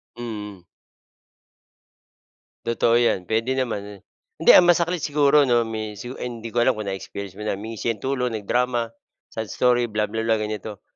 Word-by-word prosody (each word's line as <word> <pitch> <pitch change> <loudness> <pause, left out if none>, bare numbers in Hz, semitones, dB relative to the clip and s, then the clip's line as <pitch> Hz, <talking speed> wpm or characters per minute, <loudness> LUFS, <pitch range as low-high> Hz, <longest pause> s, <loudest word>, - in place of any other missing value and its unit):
Mm. 105 -6 -7 2.0
Totoo 115 0 +2
'yan, 120 -6 +1
puwede 115 +4 +1
naman, 105 -6 -3 0.4
hindi - - +7
ang 180 - +8
masakit 175 -1 +2
siguro 145 -1 +4
'no, 120 -2 +3
may 110 -1 -4
su 120 +5 -7
hindi 115 -2 -6
ko 120 +1 0
alam 130 - +4
kung 105 -2 -5
na-experience 95 0 -7
mo 105 - -6
na, - - 0
humingi 110 +2 -7
siya 115 0 -1
tulong, 125 -3 -1
nag-drama, 120 +2 0 0.4
sad 110 -2 -5
story, 120 -1 +2
blah 105 -2 -1
blah 110 +1 -2
blah, 115 -1 +3
ganito. 105 -1 -5
115 Hz, 160 wpm, -23 LUFS, 105-125 Hz, 2.0 s, ang